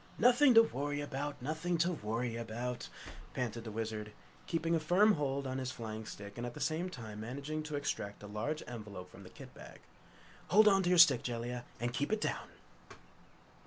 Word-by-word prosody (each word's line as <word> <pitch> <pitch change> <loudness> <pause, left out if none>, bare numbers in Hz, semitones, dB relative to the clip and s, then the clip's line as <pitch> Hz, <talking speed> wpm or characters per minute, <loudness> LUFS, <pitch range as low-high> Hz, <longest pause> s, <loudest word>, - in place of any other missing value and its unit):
"Nothing 250 +2 +6
to 225 - +10
worry 145 - -2
about! 145 0 -4
Nothing 160 +5 -1
to 170 +2 +2
worry 115 -4 -2
about!" 120 +2 -4 0.5
panted 115 -2 -2
the - - -4
Wizard, 110 -1 -4 0.4
keeping 165 0 0
a 165 - +3
firm 180 +7 +5
hold 140 -3 -1
on 130 0 -2
his 130 -1 -2
flying 110 -3 -6
stick 100 +2 -8
and 120 - -3
at 120 - -7
the - - -7
same 165 +3 -1
time 110 -9 -8
managing 140 +7 -4
to 155 -1 -5
extract 100 -8 -3
a - - -7
large 115 +10 -3
envelope 105 -6 -8
from - - -13
the - - -11
kit - - -12
bag. - - -12 0.7
"Hold 215 +3 +6
on 195 -2 +6
to 175 - +1
that 180 - +4
stick, 145 -8 +8
Jellia, 120 0 -4
and 120 0 -2
keep 145 +7 -1
it 215 - +2
down!" - - -2
130 Hz, 195 wpm, -34 LUFS, 115-160 Hz, 0.7 s, to